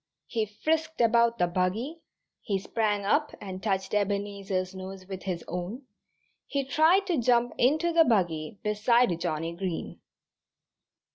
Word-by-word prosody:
He 220 -2 -1
frisked 320 +9 -1
about 235 0 +4
the 180 - +3
buggy, 190 - -1 0.4
he 200 -3 -1
sprang 205 +1 -1
up 295 +9 +1
and 190 -1 -7
touched 195 -2 -1
Ebenezer's 200 -2 -1
nose 190 0 -8
with 190 -1 -7
his 180 -3 -4
own, 180 - -5 0.6
he 280 -2 -1
tried 320 +8 +4
to 350 -7 0
jump 240 0 +3
into 315 +7 +3
the 330 0 +7
buggy 175 - 0
beside 210 -2 +2
Johnnie 165 -1 -2
Green. 180 -2 -4
205 Hz, 135 wpm, -28 LUFS, 185-250 Hz, 0.6 s, the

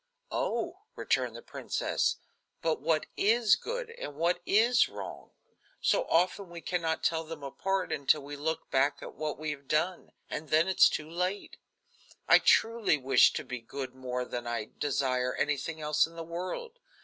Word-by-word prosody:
"Oh!" 235 - -2 0.2
returned - - 0
the - - -9
princess, - - -1 0.5
"but 160 -1 0
what 160 -2 +1
is 220 0 +4
good - - -5
and 145 - -7
what 175 +3 +1
is 235 +4 +4
wrong? - - -8 0.5
So - - +2
often 185 +2 +1
we 170 0 -8
can 180 +1 -2
not 160 -1 -1
tell 165 -1 +1
them 160 -2 -8
apart 190 +7 -2
until 140 +1 +2
we 145 +1 -7
look 160 +3 -3
back 135 +2 +2
at - - -8
what 155 -3 -3
we 155 0 -3
have 140 -2 -8
done, 160 +5 0 0.2
and 150 0 -5
then 160 +4 +4
it 190 - -2
is - - +10
all - - -2
too 155 0 -5
late. 180 +4 -2 0.7
I - - +8
truly 225 -7 +3
wish 130 -2 +5
to - - -3
be 125 -2 -6
good 130 +2 -6
more 125 -1 -3
than 120 -1 -5
I 115 -2 -3
desire 130 -3 0
anything 150 +2 -1
else 150 +1 +2
in 165 - -16
the 165 - -5
world. 185 - -5
160 Hz, 180 wpm, -30 LUFS, 140-185 Hz, 0.7 s, is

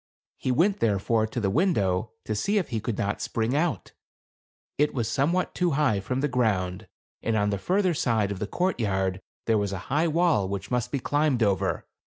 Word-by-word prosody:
He 130 - -1
went, 185 +10 +2
therefore, 110 +1 +1
to 115 - -4
the 100 -4 0
window 110 - +1
to 110 - -2
see 200 - 0
if 190 - 0
he 115 -4 -1
could 115 0 -3
not 100 +1 -1
spring 115 +3 -1
out. 150 - -1 0.9
It 150 0 +2
was 120 -4 0
somewhat 150 +10 0
too 175 -3 +1
high 135 -10 +2
from 125 +7 -2
the 145 - +2
ground, 105 -6 0 0.3
and 110 -1 0
on 105 0 +1
the 100 - -1
further 185 - +1
side 110 -8 +1
of 100 - -4
the 105 - -2
courtyard 95 - -1 0.2
there 110 -2 +3
was 100 -1 -1
a - - -2 0.2
high 155 +3 +3
wall 160 - +2
which 100 +3 -5
must 125 -2 0
be 140 - 0
climbed 145 -3 +1
over. 100 -4 0
115 Hz, 195 wpm, -26 LUFS, 100-150 Hz, 0.9 s, there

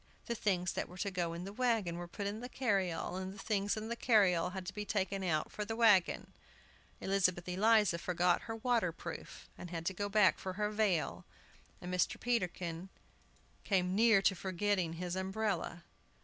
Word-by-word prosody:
The 235 - -2
things 185 -5 0
that - - -3
were 180 - -11
to 200 +2 -2
go 175 -3 -1
in 170 +1 -5
the 195 +2 -7
wagon 220 -8 0
were 175 0 -6
put 200 +4 -6
in 205 +2 -3
the 245 - -6
carryall, 190 -8 -1
and 190 0 -4
the 200 - -11
things 205 0 -1
in 215 +1 -4
the 235 - -2
carryall 195 -8 +3
had 190 -2 -5
to 190 - -5
be 210 +1 -4
taken 195 -1 -1
out 155 -4 0
for 210 - -4
the 225 +2 -4
wagon! 210 -6 +3 0.7
Elizabeth 185 -3 +1
Eliza 205 -1 +3
forgot 175 0 +1
her 225 - -2
water 225 -5 +1
proof, 165 0 -8
and 180 - -7
had 165 -1 -5
to 190 - 0
go 205 +2 -3
back 205 -2 +4
for 185 - -4
her 210 +2 -1
veil, 180 - 0 0.6
and 180 - -6
Mr. 180 - +1
Peterkin 180 -6 -2 0.7
came 185 -2 +1
near 220 -1 +5
forgetting 190 -1 0
his 175 +1 -4
umbrella. 190 -2 -2
Mrs. - - -34
190 Hz, 190 wpm, -34 LUFS, 175-210 Hz, 0.7 s, near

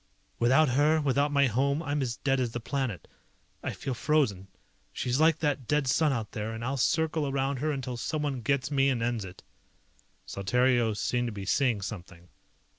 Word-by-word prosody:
"Without 130 +5 +4
her, 150 +5 +3
without 145 0 +1
my 140 -1 +4
home, 140 +6 +1
I'm 145 -1 -1
as 120 -3 -2
dead 135 +1 0
as 120 -3 -1
the 120 - -3
planet. 125 -4 -3 0.5
I - - -3
feel 135 - -4
frozen. 120 -9 0 0.4
She's 125 +2 -1
like 160 0 +4
that 145 -5 -1
dead 150 -1 +1
sun 150 +4 +2
out 115 -5 -3
there, 110 +1 -4
and 115 +1 -5
I'll 135 +2 -1
circle 160 +2 +1
around 135 0 -1
her 150 +5 -1
until 130 -3 -4
someone 145 -1 -2
gets 135 +3 0
me 135 -1 +3
and 120 -3 0
ends 115 -4 -1
it." 90 -1 -12 0.8
Saltario 120 +3 +1
seemed 120 +3 0
to - - -3
be 100 -2 -7
seeing 120 -1 +1
something. 90 -3 -8
130 Hz, 185 wpm, -28 LUFS, 115-145 Hz, 0.8 s, Without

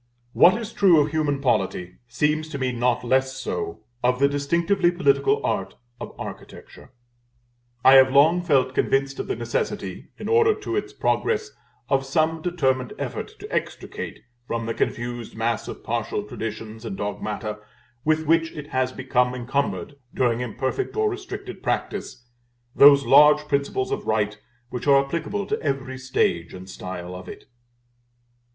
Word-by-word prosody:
What 200 +6 +6
is 230 -1 -7
true 180 -5 +5
of 145 0 +1
human 150 -3 0
polity 95 -7 -1
seems 150 +6 0
to 150 - -5
me 130 -2 -1
not 120 0 0
less 130 +2 +1
so 410 - -4 0.2
of 125 +1 +3
the 140 +2 +4
distinctively 170 +6 +1
political 180 - +2
art - - -2 0.2
of - - -8
Architecture. - - -10 0.9
I 135 - +9
have 130 0 +6
long 155 +6 +5
felt 135 -7 +2
convinced 135 +1 0
of - - -3
the 395 - -1
necessity, - - -3
in - - -6
order 450 -1 +4
to 405 -4 -4
its 415 - -2
progress, 435 -2 0 0.4
of 135 -1 +1
some 155 +4 0
determined 130 -8 0
effort - - -5
to - - -9
extricate - - -4 0.3
from 115 -1 -2
the 115 - -2
confused 120 0 -3
mass 115 0 -1
of - - -8
partial 105 - -2
traditions 110 +1 -6
and 105 -4 -5
dogmata 105 +1 -4 0.4
with 155 0 +1
which 165 +1 +2
it 150 -1 -8
has 130 -4 0
become 125 -1 0
encumbered 140 +3 -2 0.2
during 120 -2 +1
imperfect 130 - -3
or 430 -1 +1
restricted 390 0 -7
practice, 120 - -3 0.5
those 140 0 +8
large 150 +1 +6
principles 140 -2 -1
of - - -3
right 105 -1 0 0.3
which 125 - -5
are 140 -1 +5
applicable 170 +7 -3
to 215 +2 -2
every 135 -3 -3
stage 85 -11 0
and 95 0 -10
style 90 -1 -7
of 90 0 -9
it. - - -10
135 Hz, 155 wpm, -24 LUFS, 120-165 Hz, 0.9 s, I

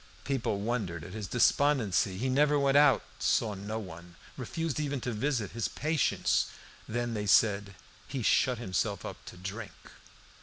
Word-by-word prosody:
People 125 -7 -1
wondered 100 -8 -2
at 90 - -9
his 105 -2 -5
despondency. 115 - +2
He 125 +6 -1
never 145 +3 +3
went 140 -1 +2
out, 145 -2 +6 0.2
saw 110 -2 +1
no 100 +3 -5
one, 85 -4 -9 0.2
refused 165 -4 -3
even 145 -2 -1
to 125 - -2
visit 115 -2 -1
his 115 -1 -2
patients. 155 -1 +1 0.4
Then 120 +1 -2
they 105 -1 -3
said 100 -1 +3 0.3
"he 130 -4 -4
shut 125 +3 +3
himself 95 -6 -2
up - - -8
to - - -10
drink." 100 +4 -7
115 Hz, 155 wpm, -30 LUFS, 100-135 Hz, 0.4 s, out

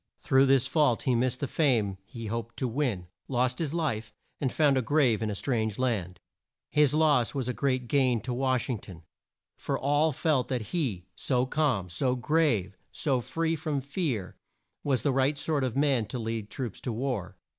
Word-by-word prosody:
Through 135 +1 +3
this 135 -2 +4
fault 145 -7 +2
he 130 - +2
missed 125 +1 0
the 140 - 0
fame 115 - +1
he 115 -1 -8
hoped 115 +1 -4
to 130 - -1
win, 120 -8 -1 0.2
lost 125 -1 0
his 155 -4 -1
life, 135 -10 -2 0.3
and 130 -3 0
found 145 -3 +3
a 130 - +2
grave 125 -3 +2
in 110 - -1
a 105 - -3
strange 110 -2 -1
land. 100 -9 -1 0.5
His 150 -1 +4
loss 150 -6 +3
was 130 -3 -1
a 125 - -1
great 130 -3 0
gain 130 -3 +3
to 125 +3 -3
Wash 130 -1 0
ing 125 -5 -2
ton, 85 -4 -12 0.5
for - - -2
all 145 +3 +2
felt 145 -2 +1
that 120 -5 -3
he, 120 - -1
so 125 -2 +1
calm, 130 - 0
so 125 +9 0
grave, 125 - +1 0.2
so 135 -4 0
free 165 +6 -1
from 150 -2 -2
fear, 140 - -3 0.5
was 135 -3 0
the 145 - +2
right 135 +2 +2
sort 145 -1 0
of 130 -1 -2
man 135 -6 +2
to 130 - -5
lead 110 -2 -3
troops 120 -5 -5
to 125 - -3
war. 115 -6 -3
130 Hz, 190 wpm, -28 LUFS, 115-145 Hz, 0.5 s, this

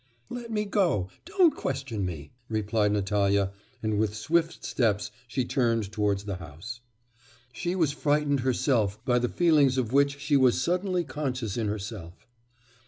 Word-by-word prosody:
'Let 240 -1 -6
me 210 -1 -1
go! 175 - +1 0.2
don't 370 -3 +4
question 130 -6 -3
me!' 80 -5 -7 0.2
replied 105 -1 +1
Natalya, 100 -1 +1 0.3
and 110 -1 0
with 105 -1 0
swift 165 +9 0
steps 105 -5 0 0.2
she 125 0 -1
turned 115 -6 0
towards 105 -2 0
the 100 -3 -4
house. 90 +8 -9 0.7
She 175 +7 -2
was 165 -6 +2
frightened 145 -1 +1
herself 120 -5 +1
by 125 -1 +3
the 120 0 0
feelings 150 -6 +4
of 125 -2 -1
which 140 0 +3
she 145 +1 +1
was 130 -3 +4
suddenly 180 0 0
conscious 130 - -3
in 115 -3 -1
herself. 100 -4 -6
120 Hz, 150 wpm, -27 LUFS, 105-150 Hz, 0.7 s, don't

